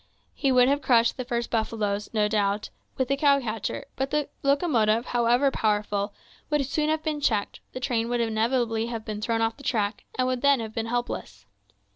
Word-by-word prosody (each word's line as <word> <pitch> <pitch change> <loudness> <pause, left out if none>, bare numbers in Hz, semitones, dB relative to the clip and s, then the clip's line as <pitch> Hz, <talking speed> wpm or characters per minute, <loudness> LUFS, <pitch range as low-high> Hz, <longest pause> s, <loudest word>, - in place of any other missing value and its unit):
He 275 - +1
would 250 -1 +5
have 285 +2 +2
crushed 235 -3 +3
the 255 - -4
first 235 -1 -2
buffaloes, 210 -2 -1
no 210 -2 +2
doubt, 205 -1 0 0.3
with 260 - 0
the 275 - +1
cow 280 0 +4
catcher; 225 -4 -4
but 270 +1 -2
the 295 0 -1
locomotive, 250 -6 +2
however 245 +3 +2
powerful, 205 -2 0 0.4
would 295 -2 +1
soon 300 +3 0
have 315 0 0
been 305 -1 -2
checked, 215 -7 0
the - - -4
train 235 -3 -1
would 240 0 0
inevitably 225 0 0
have 230 -2 -5
been 215 -1 -5
thrown 225 +1 0
off 225 0 -1
the 280 - -13
track, 215 -5 -1
and 255 0 +2
would 255 -1 -1
then 280 -2 +4
have 220 -1 -5
been 225 0 -2
helpless. 225 - -4
235 Hz, 195 wpm, -26 LUFS, 220-270 Hz, 0.4 s, would